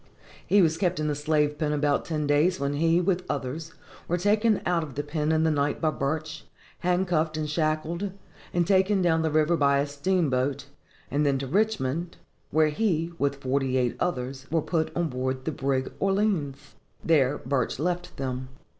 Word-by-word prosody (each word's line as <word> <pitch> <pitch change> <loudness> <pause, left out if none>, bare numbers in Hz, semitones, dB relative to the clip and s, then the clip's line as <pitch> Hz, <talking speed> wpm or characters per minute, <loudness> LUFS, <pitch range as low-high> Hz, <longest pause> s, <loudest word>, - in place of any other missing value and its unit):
He 200 -1 +5
was 160 -1 +2
kept 180 -3 0
in 155 - 0
the 150 - +1
slave 150 0 0
pen 150 -2 0
about 145 -1 +1
ten 155 -2 -2
days, 150 +5 +2
when 140 0 -1
he, 165 +3 +3
with 180 0 0
others, 145 +4 -4 0.3
was 175 +1 -1
taken 210 +1 +3
out 175 -1 +2
of 150 -5 -7
the 145 - -2
pen 150 +1 -1
in 160 0 +2
the 160 - +3
night 145 -1 0
by 155 -2 +1
Burch, 155 +2 -3 0.4
handcuffed 175 -3 +1
and 155 -1 -2
shackled, 155 +5 -1 0.4
and 175 -1 +1
taken 190 +1 +3
down 165 -2 +3
the 160 - +1
river 155 +2 +3
by 140 -3 +3
a 140 - +2
steamboat, 145 -3 0 0.5
and 145 +2 +1
then 140 -2 +2
to 135 - -4
Richmond, 170 -2 -1 0.3
where 155 0 +3
he, 165 -1 0
with 140 0 +1
forty 130 0 0
eight 125 -2 +1
others, 130 -4 -3
was 160 0 +1
put 160 -3 0
on 170 -2 0
board 130 0 -3
the - - 0
brig 135 -2 -1
Orleans. 195 -9 0 0.3
There 145 -4 +3
Burch 130 -1 -1
left 175 +4 -2
them. 130 -1 -4
155 Hz, 180 wpm, -26 LUFS, 140-175 Hz, 0.5 s, He